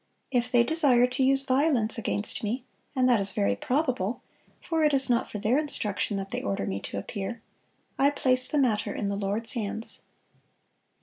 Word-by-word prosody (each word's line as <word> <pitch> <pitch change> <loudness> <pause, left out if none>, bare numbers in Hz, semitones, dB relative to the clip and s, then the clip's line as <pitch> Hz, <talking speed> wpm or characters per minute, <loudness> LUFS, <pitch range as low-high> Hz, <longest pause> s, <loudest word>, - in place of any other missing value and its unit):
If 245 -2 0
they 240 -1 +5
desire 265 -4 +3
to 250 +2 -1
use 270 +1 +3
violence 265 -4 +2
against 210 -2 +2
me, 235 +5 -2 0.3
and 255 -1 +3
that 245 -3 +4
is 195 0 -2
very 100 0 +1
probable 250 - -1 0.4
(for 325 -2 -1
it 300 -2 +3
is 265 -2 +2
not 235 - +1
for - - -4
their 225 +7 +1
instruction 210 -9 -1
that 195 -1 -5
they - - -2
order 100 -1 -2
me 95 0 -3
to 100 - -6
appear), 200 - -5 0.6
I 275 - +5
place 255 -3 +2
the 300 - -1
matter 220 -6 +1
in 200 - -2
the 200 - -2
Lord's 205 +3 -2
hands. 220 -1 -1
240 Hz, 185 wpm, -27 LUFS, 205-270 Hz, 0.6 s, they